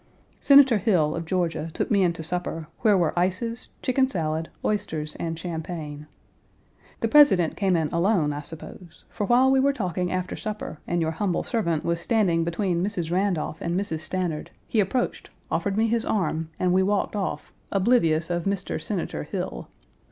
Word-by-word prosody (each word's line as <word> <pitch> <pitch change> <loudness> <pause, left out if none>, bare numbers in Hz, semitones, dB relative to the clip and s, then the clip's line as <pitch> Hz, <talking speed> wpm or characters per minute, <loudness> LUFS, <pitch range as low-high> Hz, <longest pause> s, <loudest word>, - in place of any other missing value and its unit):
Senator 275 -6 +6
Hill, 175 -7 +2
of 165 - -4
Georgia, 165 -2 -1
took - - -2
me 200 -2 +4
in 180 -2 +3
to 165 - -7
supper, 165 -1 -3
where 210 -3 +4
were 170 -3 +1
ices, 215 +7 -1
chicken 260 +1 +2
salad, 160 -8 -2 0.2
oysters, 160 -8 -2
and 165 -1 -3
champagne. 160 -3 -6 0.9
The - - +2
President 280 - +5
came 190 -3 +1
in 160 -2 +1
alone, 170 -4 +2
I 145 - -4
suppose, 160 +2 -11
for 205 - -2
while 255 +2 +5
we 265 - +4
were 275 +1 +4
talking 180 - -2
after 185 0 -2
supper 210 -8 -5
and 175 -1 0
your 160 - 0
humble 180 +2 -1
servant 170 -9 -1
was 170 0 0
standing 175 -4 +2
between 170 +1 -1
Mrs. 180 -5 -2
Randolph 180 -4 -1
and 170 +2 0
Mrs. 180 -6 -3
Stanard, 170 -1 -3 0.2
he 225 - 0
approached, 210 +5 -1 0.2
offered 200 0 0
me 220 - +3
his 230 0 +1
arm 165 -7 -1
and 180 -1 +2
we 190 - +4
walked 200 +2 0
off, 200 -2 -3 0.2
oblivious 180 -6 +2
of 175 -1 -1
Mr. 195 -1 -2
Senator 175 - -3
Hill. - - -5
180 Hz, 175 wpm, -25 LUFS, 165-210 Hz, 0.9 s, Senator